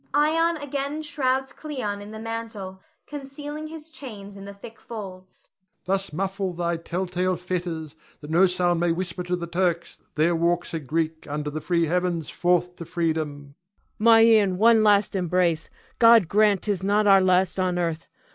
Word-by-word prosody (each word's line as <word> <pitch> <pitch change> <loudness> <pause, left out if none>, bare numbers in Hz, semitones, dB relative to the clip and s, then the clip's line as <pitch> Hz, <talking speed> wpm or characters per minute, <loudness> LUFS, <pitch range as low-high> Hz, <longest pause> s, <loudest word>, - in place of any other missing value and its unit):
[Ion 325 +3 +3
again 285 +1 -3
shrouds 265 -3 -1
Cleon 250 -10 -5
in 205 - -9
the 220 - -8
mantle, 220 -4 -6 0.2
concealing 290 +2 -7
his 320 0 -9
chains 205 -9 -9
in 195 0 -10
the 200 - -8
thick 225 +3 -12
folds.] 190 -5 -10 0.3
Thus 195 -1 -1
muffle 190 +3 -2
thy 170 0 -1
tell 175 +3 -3
tale 185 +1 -1
fetters, 170 -3 -4 0.2
that 150 0 -9
no 180 +4 +5
sound 175 -1 +1
may 175 0 +2
whisper 180 +1 -3
to 180 0 -1
the 175 -1 -5
Turks 170 0 -2
there 165 +3 +2
walks 170 +1 0
a 165 - -1
Greek 160 +2 -3
under 150 0 -3
the 155 +1 -5
free 170 0 +1
heavens 175 -1 -1
forth 180 0 +1
to 170 - -7
freedom. 155 -4 -3
Cleon. - - -43 0.4
My 225 +1 +6
Ion, 215 -5 +5
one 225 +1 +5
last 205 -1 +3
embrace! 175 -3 0 0.3
God 230 -5 +7
grant 205 0 +3
'tis 205 -4 -1
not 205 +2 +2
our 195 -1 +6
last 185 0 +2
on 180 -1 0
earth! 165 -2 -2
185 Hz, 175 wpm, -24 LUFS, 170-220 Hz, 0.4 s, God